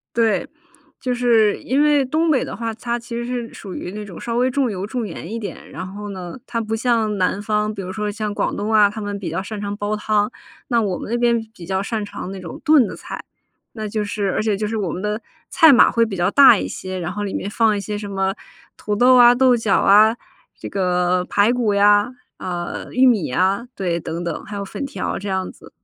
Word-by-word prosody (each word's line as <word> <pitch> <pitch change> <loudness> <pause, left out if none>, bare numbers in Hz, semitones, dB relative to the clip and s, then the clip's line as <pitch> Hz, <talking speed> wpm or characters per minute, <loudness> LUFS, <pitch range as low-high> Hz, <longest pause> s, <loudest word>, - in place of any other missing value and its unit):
对。 230 -2 +2 0.5
就 250 - -2
是 235 -4 +3
因 275 +3 +2
为 295 -2 +3
东 315 +5 +1
北 265 - +2
的 - - -6
话， 230 -1 -3
它 235 +1 -3
其 240 0 -10
实 235 - -3
是 240 -1 -4
属 195 -3 -9
于 180 - -5
那 210 +1 -6
种 190 -4 -10
稍 235 0 -3
微 255 +1 +3
重 260 -3 0
油、 195 +1 -4
重 240 0 -3
盐 180 - -7
一 225 - -4
点， 215 -3 -7
然 - - -6
后 205 +2 -8
呢， 180 -3 -7
它 230 - -2
不 220 0 -4
像 225 -3 +1
南 185 +2 0
方， 210 0 0
比 200 - -6
如 185 - -6
说 210 +1 -3
像 210 0 -3
广 - - -1
东 210 +2 -2
啊， 210 -2 +5
他 215 +2 -7
们 205 -1 -4
比 180 -4 -4
较 175 +4 -3
擅 210 +1 -6
长 205 0 -4
煲 205 +1 -2
汤。 210 +1 0 0.4
那 235 -2 +3
我 195 -4 -1
们 - - -7
那 240 - +1
边 235 -1 +2
比 175 - -11
较 190 +2 -1
擅 215 0 -3
长 190 -2 -7
那 195 - -7
种 175 -3 -8
炖 300 -7 +5
的 - - -7
菜， - - -8 0.5
那 220 -2 -5
就 210 0 -2
是 205 -2 -2
而 - - 0
且 215 -1 +1
就 210 +2 -2
是 220 +1 -2
我 195 -5 -2
们 185 - -5
的 210 +2 -2 0.3
菜 320 -3 +7
码 245 - +6
会 230 0 +3
比 210 -3 -5
较 175 +2 +1
大 275 -5 +8
一 - - -3
些， 185 0 -6
然 175 0 -3
后 205 +2 -4
里 195 - -4
面 200 - -3
放 220 0 +2
一 200 - -2
些 210 +1 -4
什 205 -1 -6
么 195 -1 -1 0.4
土 210 -1 -2
豆 250 +3 +6
啊、 245 0 +8
豆 255 -1 +4
角 220 -3 +1
啊， 215 +3 +5 0.4
这 - - -7
个 180 -1 +1
排 205 +5 +3
骨 235 -4 +1
呀， 205 +2 +4 0.3
啊， 175 -2 -5
玉 255 +1 +4
米 230 -9 +4
呀， 190 - 0
对， 175 -3 -1
等 165 +1 -5
等， 170 -2 -4
还 210 - -7
有 200 - -3
粉 200 +7 -5
条 280 - -4
这 205 - -7
样 190 -1 -2
子。 - - -16
210 Hz, 265 characters per minute, -20 LUFS, 195-235 Hz, 0.5 s, 大